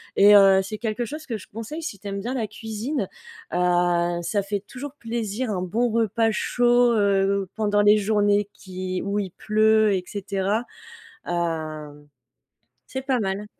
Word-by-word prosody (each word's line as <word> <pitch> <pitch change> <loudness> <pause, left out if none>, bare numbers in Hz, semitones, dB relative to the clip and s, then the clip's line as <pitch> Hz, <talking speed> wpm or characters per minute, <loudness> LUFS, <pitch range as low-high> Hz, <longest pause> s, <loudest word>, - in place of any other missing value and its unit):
et 205 +1 +7
heu, 195 -1 +7
c'est 215 +2 -6
quelque 225 +1 -2
chose 305 +5 -7
que 225 -3 -3
je - - -13
conseille 230 +10 -6
si 210 -11 -5
tu 205 - -9
aimes 200 0 -3
bien 245 +5 -3
la 230 -4 -1
cuisine, 220 +6 -4 0.5
heu. 175 -1 +2
Ça 200 +4 -1
fait 200 0 -2
toujours 265 +6 -8
plaisir 230 0 -3
un 185 -2 -2
bon 235 +7 0
repas 225 0 +1
chaud, 245 +2 +3
heu, 200 -2 +2
pendant 205 -1 +2
les 205 +1 +6
journées 205 -1 +2
qui 185 -1 -5
où 200 +1 -2
il 190 -3 -3
pleut 215 0 +3
et 185 -1 -1
cetera. 200 +3 -2 0.6
Hem, 155 -4 -4 0.8
c'est 265 0 -5
pas 255 -3 +1
mal. 195 +1 -2
205 Hz, 165 wpm, -24 LUFS, 190-225 Hz, 0.8 s, et